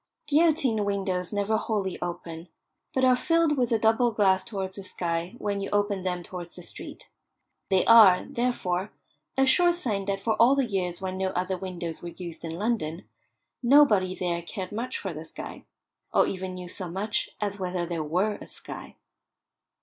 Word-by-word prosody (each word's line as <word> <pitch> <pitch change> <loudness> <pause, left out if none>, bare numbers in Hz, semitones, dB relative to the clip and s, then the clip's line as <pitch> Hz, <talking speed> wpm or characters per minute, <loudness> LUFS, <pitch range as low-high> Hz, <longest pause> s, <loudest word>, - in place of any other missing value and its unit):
Guillotine 290 -7 +3
windows 190 -3 -1
never 205 +1 +1
wholly 200 -5 -2
open, 170 -1 -5 0.4
but 260 0 +2
are 255 0 +6
filled 330 +2 +2
with 245 -3 +1
a 230 - +4
doubled 225 +1 +2
glass 190 -3 +4
towards 190 -3 -4
the 195 - -7
sky 170 +1 -2
when 200 -3 -2
you 195 - -3
open 205 -1 +1
them 180 -1 -2
towards 175 -1 -7
the 180 - -8
street. - - -10 0.6
They 190 -2 +3
are, 215 -6 +8
therefore, 210 -6 -1 0.5
a 270 - +5
sure 350 +6 +5
sign 220 - -1
that 195 0 -1
for 220 +3 0
all 240 +5 +6
the 275 -2 +2
years 185 -5 -2
when 185 0 -3
no 190 0 +1
other 185 +1 -1
windows 175 -3 -5
were 175 - -6
used 170 -2 -8
in 165 -1 -4
London, 190 -6 -2 0.5
nobody 235 -9 +5
there 175 -2 -1
cared 185 +2 -6
much 240 +5 -3
for 190 -3 -5
the 155 +1 -7
sky, 160 - -9 0.5
or - - +4
even 185 -1 -4
knew 180 -1 -7
so 180 0 -4
much 200 +5 -1
as 205 -1 -3
whether 180 -1 -2
there 170 -2 -3
were 185 +7 0
a - - -9
sky. - - -9
195 Hz, 180 wpm, -27 LUFS, 180-225 Hz, 0.6 s, are